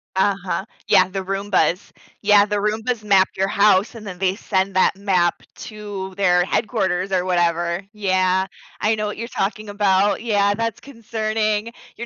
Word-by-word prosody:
Uh-huh. 195 -1 0 0.2
Yeah, 185 - +5
the 190 0 -4
Roombas. 195 -1 0 0.3
Yeah, 205 0 +5
the 210 0 -2
Roombas 215 +2 -1
map 195 -2 +4
your 190 +1 0
house, 200 +2 +3
and 215 - -10
then 185 -3 -8
they 190 0 +1
send 190 -2 -1
that 185 - +3
map 185 -4 +1
to 205 -3 -7
their 180 -2 +3
headquarters 195 -4 -1
or 185 -1 +1
whatever, 175 0 0
yeah. 190 -2 +1 0.3
I 215 - +2
know 210 -1 -2
what 210 - -5
you're 230 +1 -5
talking 210 -1 -3
about, 205 0 +2
yeah, 205 -3 +2
that's 230 0 -3
concerning. 220 -3 -2 0.2
You're 235 - -6
200 Hz, 160 wpm, -21 LUFS, 190-210 Hz, 0.3 s, Yeah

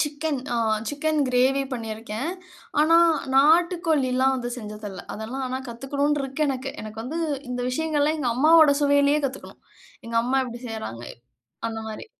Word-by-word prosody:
Chicken 295 -1 -1
ஆ - - 0 0.3
chicken 305 +1 0
gravy 260 +2 +3
பண்ணிருக்கேன். 225 +3 -4 0.5
ஆனா 320 +2 +5 0.4
நாட்டுக்கோழில்லாம் 300 -4 +3
வந்து 245 -1 -4
செஞ்சது 210 -1 -8
இல்ல. 185 -2 -8
அதெல்லாம் 235 +5 -5
ஆனா 255 +1 -3
கத்துக்குணும்னு 280 +5 -1
இருக்கு 270 +3 -1
எனக்கு. 265 0 -3
எனக்கு 215 +1 -7
வந்து 290 +8 -4 0.3
இந்த 250 0 -3
விஷயங்கள்லாம், 305 +2 0
எங்க 250 -4 0
அம்மாவோட 310 +1 +6
சுவையிலயே 285 +1 +4
கத்துக்கணும். 270 0 -9 0.4
எங்க 230 - -3
அம்மா 260 +2 +1
எப்டி 240 -1 -8
செய்றாங்க 220 - -6 0.6
அந்தமாரி. 220 - -6
270 Hz, 140 wpm, -24 LUFS, 235-295 Hz, 0.6 s, அம்மாவோட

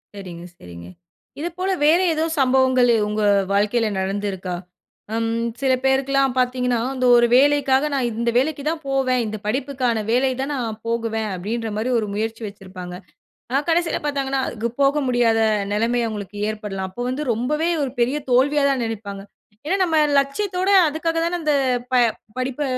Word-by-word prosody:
சரிங்க 175 -3 -9
சரிங்க. 85 -1 -11 0.5
இதுப்போல 350 +4 -3
வேற 320 +4 +5
ஏதோ 315 0 0 0.2
சம்பவங்கள், 260 -1 +3 0.2
உங்க 210 +1 -2 0.3
வாழ்க்கையில 210 +3 +2
நடந்திருக்கா? 190 -1 -3 0.6
ம் 230 0 0 0.3
சில 265 -1 +3
பேருக்குலாம் 270 0 +2
பார்த்தீங்கன்னா, 250 -1 +1 0.2
இந்த 255 -1 0
ஒரு 240 0 +4
வேலைக்காக 280 0 +4
நான் 265 -3 +1
இந்த 235 0 +1
வேலைக்கு 285 +2 0
தான் 325 0 -3
போவேன், 265 -2 +1
இந்த 215 0 -4
படிப்புக்கான 250 -2 -1
வேலை 260 +2 +2
தான் 275 +2 -3
நான் 225 -4 -4
போகுவேன், 225 -2 -1
அப்டின்ற 220 +5 -3
மாரி 230 +4 -1
ஒரு 215 - -3
முயற்சி 225 +2 -3
வச்சிருப்பாங்க. 185 -3 -9 0.5
ஆனா 265 +3 +2
கடைசியில 335 0 +1
பார்த்தாங்கன்னா 275 -2 -1
அதுக்கு 230 0 -3
போக 275 +2 +3
முடியாத 240 -2 +2 0.3
நெலைம 230 +4 +1
அவுங்களுக்கு 210 -2 -6
ஏற்படலாம். 210 -3 -4
அப்ப 190 +6 -8
வந்து 265 +4 -2
ரொம்பவே 300 +8 -1
ஒரு 275 -3 -2
பெரிய 250 +5 +2
தோல்வியா 280 +4 +3
தான் 270 -2 0
நெனைப்பாங்க 200 -3 -6 0.4
ஏன்னா 345 +6 +1
நம்ம 325 -3 +1 0.2
லட்சியத்தோட 360 +7 0 0.2
அதுக்காக 325 +2 -2
தானே 340 +1 -1
அந்த 305 -2 +1 0.8
படிப்ப 255 +3 -2
250 Hz, 150 wpm, -21 LUFS, 215-275 Hz, 0.8 s, வேற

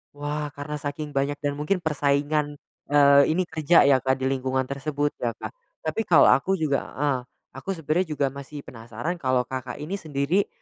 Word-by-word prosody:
Wah, 145 0 -3
karena 150 0 -6
saking 145 0 -5
banyak 145 +1 0
dan 145 -1 -2
mungkin 150 +6 0
persaingan, 145 -1 0 0.3
eee, 140 -1 +7
ini 180 +1 0
kerja 160 -1 +4
ya 130 -3 +4
Kak, 130 0 +1
di 130 - 0
lingkungan 130 -1 -1
tersebut 145 +1 -2
ya 120 -1 -2
Kak. - - -5 0.3
Tapi 225 - -2
kalau 165 -8 +6
aku 190 +7 +3
juga 145 -3 +1
heeh. 140 -2 -1 0.3
Aku 195 - -5
sebenernya 160 +3 0
juga 140 - +1
masih 140 +1 -9
penasaran 120 +8 -5
kalau 130 -1 +1
Kakak 130 -1 -5
ini 160 +7 -4
sendiri, 155 +6 0
145 Hz, 175 wpm, -25 LUFS, 135-155 Hz, 0.3 s, eee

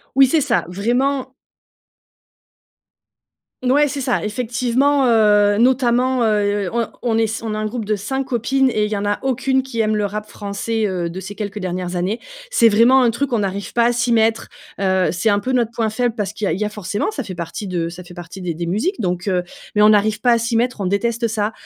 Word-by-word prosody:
Oui, 270 0 +7
c'est 305 +5 +2
ça. 260 -4 +1
Vraiment 255 +7 -1 2.3
Mouais, 285 +4 +3
c'est 285 0 -4
ça, 250 -4 0
effectivement, 250 +5 +1
heu, 210 -3 +4
notamment, 250 0 +2
heu, 205 -3 +1
on 235 -1 0 0.2
on 225 -2 +1
est 225 0 -1
on 225 -1 -3
est 215 - -3
un 215 - -2
groupe 225 +1 -4
de 215 +1 0
5 265 +7 -3
copines 265 +1 +1
et 210 -3 0
il - - -6
y 215 - -1
en 200 - -3
a 205 0 0
aucune 265 0 +1
qui 240 -4 -5
aime 215 0 +1
le 210 -1 0
rap 210 +1 -5
français, 210 +2 -3
heu, 180 -3 -2
de 185 +3 -6
ces 190 +2 -8
quelques 210 0 -5
dernières 180 -1 -4
années. 185 +6 -2 0.3
C'est 230 - +5
vraiment 235 +5 +5
un 240 - +4
truc, 255 +2 -2
on 220 - +1
arrive 195 +1 -4
pas 235 - +3
à - - +2
s'y 240 0 0
mettre, 225 0 +1 0.3
heu, 190 -1 +2
c'est 180 +5 0
un 205 -1 +3
peu 255 +5 -2
notre 235 -3 +1
point 225 -2 -1
faible 240 +1 -1
parce 205 -4 -3
qu'il 210 -1 -3
y - - +2
a - - +1
il - - -4
y - - +1
a 210 - -2
forcément, 210 - -3
ça 300 -10 -4
fait 190 -5 -7
partie 170 +4 -6
de 170 -2 -2
ça 175 +1 -9
fait 175 0 -13
partie 175 +1 -9
des 175 -2 -3
des 170 +2 -4
musiques, 215 - -1
donc 180 -1 -2
heu, 180 -2 +1 0.3
mais 210 - +3
on 210 +1 +7
arrive 215 +1 +2
pas 245 - +4
à 235 - +4
s'y 230 0 -1
mettre, 240 -2 0
on 190 - -1
déteste 230 +4 0
ça, 215 0 -1
220 Hz, 235 wpm, -19 LUFS, 200-245 Hz, 2.3 s, Oui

